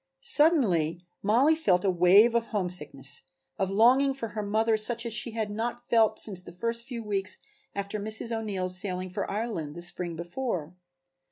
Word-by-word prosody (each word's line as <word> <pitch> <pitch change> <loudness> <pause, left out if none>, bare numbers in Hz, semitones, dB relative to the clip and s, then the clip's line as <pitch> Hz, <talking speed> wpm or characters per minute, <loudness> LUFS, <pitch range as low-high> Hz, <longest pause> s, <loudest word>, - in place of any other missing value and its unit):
Suddenly 180 - +3 0.2
Mollie 250 +10 +3
felt 195 - +1
a 190 - +3
wave 185 +6 +5
of 235 -1 0
homesickness, 185 - -1 0.4
of 190 -1 0
longing 255 +7 +4
for 230 -4 -5
her 210 0 -4
mother 220 +2 +1
such 230 +2 -2
as 230 - -3
she 220 +1 -2
had 220 -2 -3
not 235 +3 -4
felt 220 -2 +3
since 190 -4 +2
the 180 - -12
first 230 +6 -2
few 235 -3 -6
weeks 195 -2 -1 0.4
after 200 +1 -4
Mrs. 220 +3 -2
O'Neill's 195 -5 -2
sailing 185 -1 -1
for - - -4
Ireland 200 -9 -4
the 175 - -7
spring 175 -1 -4
before. 175 - -4
210 Hz, 170 wpm, -27 LUFS, 185-230 Hz, 0.4 s, wave